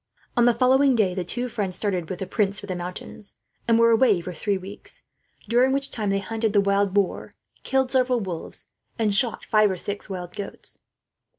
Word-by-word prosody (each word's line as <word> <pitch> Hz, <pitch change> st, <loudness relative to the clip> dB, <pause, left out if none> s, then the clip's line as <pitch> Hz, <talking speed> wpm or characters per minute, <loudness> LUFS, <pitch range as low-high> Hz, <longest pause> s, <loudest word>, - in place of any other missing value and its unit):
On 240 Hz, -, +4 dB
the 240 Hz, -, +5 dB
following 260 Hz, +2 st, +4 dB
day, 200 Hz, -5 st, +2 dB
the 185 Hz, -1 st, -2 dB
two 245 Hz, +8 st, -2 dB
friends 205 Hz, -6 st, -3 dB
started 185 Hz, -6 st, -2 dB
with 185 Hz, -, -4 dB
the 190 Hz, -, -4 dB
prince 200 Hz, +1 st, 0 dB
for -, -, -8 dB
the 185 Hz, -2 st, -4 dB
mountains; 180 Hz, +3 st, -7 dB, 0.3 s
and 230 Hz, -1 st, +4 dB
were 230 Hz, 0 st, +5 dB
away 225 Hz, -4 st, +4 dB
for 180 Hz, +1 st, -6 dB
three 200 Hz, +5 st, -1 dB
weeks, 195 Hz, +2 st, -11 dB, 0.4 s
during 245 Hz, +4 st, +3 dB
which 275 Hz, 0 st, -1 dB
time 210 Hz, -3 st, -2 dB
they 195 Hz, -, +2 dB
hunted 220 Hz, +2 st, -2 dB
the 205 Hz, -, +5 dB
wild 200 Hz, 0 st, +2 dB
boar, 200 Hz, -1 st, -1 dB, 0.3 s
killed 265 Hz, -1 st, 0 dB
several 255 Hz, -2 st, +2 dB
wolves, 180 Hz, -6 st, -6 dB, 0.3 s
and 215 Hz, -3 st, +1 dB
shot 230 Hz, +3 st, 0 dB
five 215 Hz, -1 st, +4 dB
or 190 Hz, -, -2 dB
six 205 Hz, +4 st, -5 dB
wild 180 Hz, -2 st, -6 dB
goats. 200 Hz, -1 st, -7 dB
205 Hz, 200 wpm, -24 LUFS, 190-235 Hz, 0.4 s, the